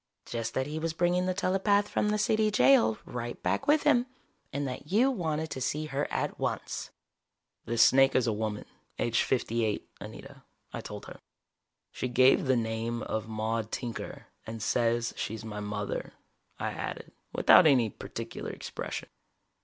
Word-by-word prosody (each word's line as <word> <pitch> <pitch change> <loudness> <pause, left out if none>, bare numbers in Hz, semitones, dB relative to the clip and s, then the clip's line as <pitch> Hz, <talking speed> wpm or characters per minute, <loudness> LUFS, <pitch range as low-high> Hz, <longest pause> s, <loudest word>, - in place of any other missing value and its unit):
"Just 115 -1 -4
that 130 - +1
he 150 +2 -4
was 165 0 -2
bringing 175 +2 +1
the 185 - +1
telepath 200 +2 +2
from 210 - 0
the 210 - +1
City 215 +1 +2
Jail 125 - +5
right 120 -1 -5
back - - 0
with 295 +1 +4
him, 245 +1 +4 0.4
and 140 0 -2
that 130 +4 -7
you 245 +7 +4
wanted 160 - -2
to 130 - -4
see 150 +4 -1
her 145 -1 -2
at - - -2
once." - - -3 0.8
"This 115 0 +4
snake 135 0 +5
is 130 - +4
a 115 - +1
woman, 105 0 -3 0.3
aged 115 -1 +1
fifty 120 -3 0
eight, 105 -2 -1
Anita," - - -10 0.3
I - - -4
told - - -8
her. - - -11 0.7
"She - - -3
gave 130 +3 +5
the 130 -1 +4
name 115 0 -2
of 110 0 -3
Maude 110 0 -2
Tinker 120 -3 -5 0.2
and 110 0 -5
says 115 +1 +1
she's 110 0 -4
my 105 -2 -5
mother," 105 0 -4 0.4
I - - -2
added, - - -6 0.2
without - - +7
any 125 -7 +4
particular - - -6
expression. - - -6
125 Hz, 165 wpm, -29 LUFS, 110-160 Hz, 0.8 s, without